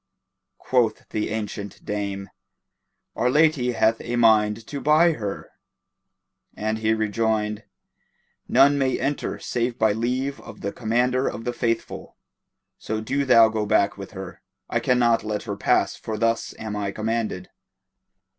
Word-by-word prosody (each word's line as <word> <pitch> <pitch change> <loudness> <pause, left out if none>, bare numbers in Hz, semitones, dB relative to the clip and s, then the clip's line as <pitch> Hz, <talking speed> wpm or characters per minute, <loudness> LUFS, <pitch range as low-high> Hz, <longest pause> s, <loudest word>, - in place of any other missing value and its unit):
quoth 120 -4 0
the 105 - -2
ancient 105 -2 -5
dame, 100 -1 -3 0.9
"Our 125 - +1
lady 145 -3 +3
hath 115 0 +2
a 120 - -3
mind 110 -2 +3
to 140 +2 -6
buy 155 +5 +5
her;" 105 -10 -5 1.1
and 110 +1 -2
he 110 0 +2
rejoined, 110 -1 -1 0.8
"None 140 +3 +5
may 130 -1 +1
enter 145 +1 -2
save 120 0 -2
by 110 -1 +3
leave 125 +5 -2
of - - -12
the 100 - -3
Commander 125 +4 0
of 115 - -4
the 120 - -1
Faithful; 115 -1 -3 0.6
so 110 0 -3
do 140 +6 -1
thou 115 -3 +7
go 110 -1 -2
back 100 0 +2
with 100 +2 -9
her. 95 -2 -8 0.3
I - - +2
can 125 - +2
not 120 -2 +3
let 105 -1 -3
her - - -4
pass - - +1
for 110 -1 -5
thus 115 +1 0
am 110 -1 -5
I 100 -1 -2
commanded." 110 -3 -3
110 Hz, 145 wpm, -24 LUFS, 105-125 Hz, 1.1 s, thou